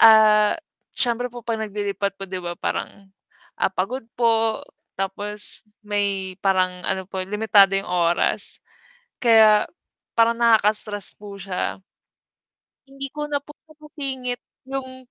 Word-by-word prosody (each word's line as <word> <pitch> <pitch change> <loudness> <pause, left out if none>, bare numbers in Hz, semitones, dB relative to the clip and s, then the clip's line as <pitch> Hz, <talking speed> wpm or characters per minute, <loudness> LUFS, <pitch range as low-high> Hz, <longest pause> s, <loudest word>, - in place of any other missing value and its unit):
Ah, 215 0 +7 0.4
siyempre 245 0 +1
po 240 - -7
'pag 225 -2 -2
naglilipat 200 -2 -2
po 195 - -6
'di 185 -1 -4
ba 175 -1 -4
parang, 195 -1 -4 0.5
ah, - - +4
pagod 220 +8 -2
po, 225 -2 +2 0.3
tapos 205 +2 -2 0.2
may 200 -2 -1
parang 185 -2 +2
ano 190 - -1
po 190 -1 -4
limitado 205 -1 +4
yung 195 -2 -3
oras, 175 -1 +1 0.6
kaya 220 -3 +6 0.5
parang 230 0 +4
nakaka-stress 215 -3 +2
po 205 -1 -10
siya. 190 0 -3 1.1
Hindi 275 0 -8
ko 300 - -5
na 290 -1 0
po 295 - -16 0.2
nasisingit 275 -5 -5 0.3
yung, 260 -2 -6
210 Hz, 125 wpm, -23 LUFS, 195-240 Hz, 1.1 s, Ah